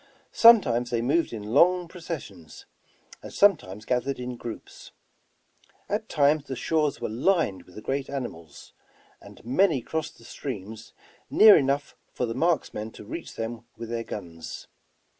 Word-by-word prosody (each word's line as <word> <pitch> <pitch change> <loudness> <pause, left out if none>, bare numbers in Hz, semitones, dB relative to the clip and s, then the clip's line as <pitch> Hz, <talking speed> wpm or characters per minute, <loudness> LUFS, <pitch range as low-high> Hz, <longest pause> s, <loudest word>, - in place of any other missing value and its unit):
Sometimes 125 - +6
they 115 -1 -1
moved 160 +7 +1
in 110 -3 -6
long 180 +4 +4
processions, 150 - -9 0.6
and - - -10
sometimes 110 - +2
gath 125 +1 0
ered 140 0 -2
in 125 0 -5
groups. 120 -1 -9 1.0
At - - -3
times 145 0 +2
the 135 - -5
shores 150 +1 0
were - - -3
lined 115 - 0
with 90 - -18
the 105 - -9
great 135 0 -2
animals, 85 - -7 0.5
and - - -15
many 155 +4 +3
crossed 160 +4 -4
the - - -18
streams 110 -4 -7 0.4
near 215 -1 +8
enough 140 -1 0 0.2
for 125 - -2
the 115 - -4
marksmen 135 -7 -1
to - - -12
reach 165 +10 -7
them 115 +1 -5
with 115 -1 -7
their 115 0 -3
guns. 85 -7 -8
125 Hz, 150 wpm, -26 LUFS, 110-160 Hz, 1.0 s, near